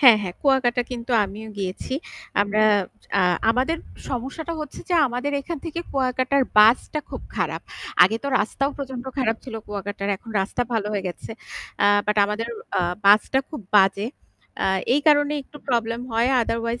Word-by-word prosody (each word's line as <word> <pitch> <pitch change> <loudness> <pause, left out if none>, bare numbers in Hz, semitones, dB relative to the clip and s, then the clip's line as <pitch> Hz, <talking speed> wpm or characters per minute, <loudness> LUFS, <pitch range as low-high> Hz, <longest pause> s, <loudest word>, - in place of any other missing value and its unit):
হ্যাঁ, 250 -6 +9
হ্যাঁ 180 -3 -5
কুয়াকাটা 260 -3 +3
কিন্তু 245 0 -4
আমিও 210 +3 -8
গিয়েছি। 195 +6 -3 0.5
আমরা 205 +1 +2 0.6
আ - - +4 0.3
আমাদের 255 +8 +1 0.3
সমস্যাটা 275 +6 -4
হচ্ছে 300 -2 -7
যে 360 - +1
আমাদের 250 +3 -3
এখান 335 +3 -5
থেকে 335 +1 -4
কুয়াকাটার 260 +1 +1 0.2
বাসটা 225 +7 +5
খুব - - -6
খারাপ। - - -1 0.4
আগে 210 +5 +4
তো 280 - -2
রাস্তাও 275 +5 0
প্রচন্ড 265 -3 -6
খারাপ 225 -4 +1
ছিল 250 - -8
কুয়াকাটার 205 -1 -4
এখন 225 +4 -13
রাস্তা 195 +5 -1
ভালো 220 -3 0
হয়ে 200 -2 -2
গেছে। 175 - -8 0.5
আ - - +6 0.2
বাট 210 0 +1
আমাদের 215 +3 -3 0.3
আ - - +3 0.2
বাসটা 210 +6 +5
খুব 305 - -6 0.2
বাজে। 195 +1 +4 0.6
আ - - +3 0.3
এই 290 - +3
কারণে 290 -1 +5
একটু 285 - -15
প্রবলেম 230 -1 0
হয়। 230 +2 +2
আদারওয়াইজ 230 +1 -2
240 Hz, 160 wpm, -23 LUFS, 210-270 Hz, 0.6 s, হ্যাঁ